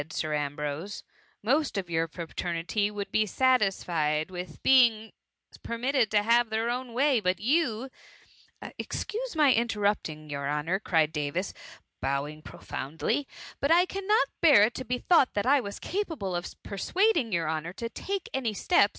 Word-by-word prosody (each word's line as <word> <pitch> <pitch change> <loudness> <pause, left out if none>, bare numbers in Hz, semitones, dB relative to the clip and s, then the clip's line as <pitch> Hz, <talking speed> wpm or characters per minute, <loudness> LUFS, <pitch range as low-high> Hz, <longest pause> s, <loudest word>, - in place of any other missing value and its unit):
Sir 155 -1 -2
Ambrose; 150 +5 -3 0.2
" - - -37
most 280 +3 +1
of 190 -2 -2
your 165 -1 0
fraternity 170 +4 -2
would 205 -1 -6
be 215 0 +2
satisfied 185 - +1
with 180 -3 -8
being 230 -4 +4 0.5
permitted 240 0 0
to 210 0 +2
have 235 +1 +3
their 225 +2 0
own 250 -1 -4
way; 265 0 +3
but 185 -2 0
you 260 -2 +1 0.4
'* - - -30 0.2
Excuse 475 -1 -4
my 295 -4 +5
interrupting 205 -9 -1
your 140 -1 -3
honour, 150 +6 -1
cried 160 -6 +1
Davis, 150 +5 -2 0.5
bowing 145 +3 -2
profoundly; 190 - -3 0.2
" - - -15
but 280 - +1
I 350 +2 +6
can 390 +1 -6
not 435 +4 +3
bear 290 -11 +7
it 225 +3 +2
to 260 - -5
be 250 +2 -1
thought 300 -1 +3
that 205 - 0
I 275 +1 +4
was 200 -3 -6
capable 320 - -3
of 175 0 -3
persuading 320 - +1
your 170 -3 0
honour 160 +2 -2
to 230 +4 -4
take 390 +10 -4
any 235 -5 -1
steps 200 - +3
210 Hz, 165 wpm, -28 LUFS, 165-260 Hz, 0.5 s, bear